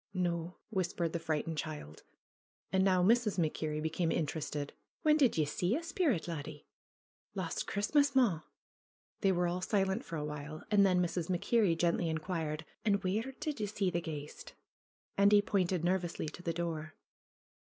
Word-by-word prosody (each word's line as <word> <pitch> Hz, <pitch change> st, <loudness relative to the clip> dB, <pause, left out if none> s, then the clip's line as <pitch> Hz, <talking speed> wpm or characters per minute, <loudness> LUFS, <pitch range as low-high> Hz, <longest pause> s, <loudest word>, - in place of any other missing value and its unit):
"No," 175 Hz, -1 st, -1 dB, 0.2 s
whispered 175 Hz, -4 st, -1 dB
the 170 Hz, -, -1 dB
frightened 160 Hz, 0 st, -2 dB
child. 150 Hz, -, -6 dB, 0.7 s
And 190 Hz, 0 st, +3 dB
now 185 Hz, -2 st, +4 dB
Mrs. 220 Hz, 0 st, +3 dB
MacKerrie 155 Hz, -2 st, -1 dB
became 165 Hz, +1 st, 0 dB
interested. 150 Hz, -2 st, -2 dB, 0.3 s
"When 305 Hz, -1 st, +5 dB
did 275 Hz, -, +3 dB
ye 155 Hz, -, +3 dB
see 175 Hz, -, 0 dB
a 325 Hz, -, -2 dB
sperrit, 325 Hz, -, 0 dB
laddie 150 Hz, -3 st, -6 dB, 0.4 s
?" -, -, -, 0.3 s
"Last -, -, -2 dB
Christmas, 280 Hz, +8 st, +2 dB
maw.'^ 215 Hz, -12 st, +4 dB, 0.8 s
They 195 Hz, -, +4 dB
were 180 Hz, -1 st, +1 dB
all 175 Hz, +1 st, -1 dB
silent 195 Hz, +2 st, +1 dB
for 170 Hz, -, -6 dB
a 150 Hz, -1 st, -2 dB
while. 150 Hz, +1 st, -6 dB
And 205 Hz, -1 st, +6 dB
then 180 Hz, -2 st, +4 dB
Mrs. 175 Hz, -1 st, -2 dB
MacKerrie 195 Hz, 0 st, +2 dB
gently 170 Hz, 0 st, +1 dB
inquired: 160 Hz, -1 st, -2 dB, 0.2 s
"And 200 Hz, -3 st, +2 dB
where 215 Hz, +8 st, -1 dB
did 300 Hz, -5 st, -3 dB
ye 210 Hz, -, -1 dB
see 195 Hz, -2 st, 0 dB
the 175 Hz, -, 0 dB
ghaist 150 Hz, -3 st, -7 dB, 0.3 s
?" -, -, -49 dB
Andy 205 Hz, +1 st, +7 dB
pointed 185 Hz, -4 st, +1 dB
nervously 175 Hz, -2 st, 0 dB
to 170 Hz, -, -11 dB
the 170 Hz, -, -1 dB
door. 160 Hz, -2 st, -4 dB
175 Hz, 165 wpm, -33 LUFS, 160-200 Hz, 0.8 s, Andy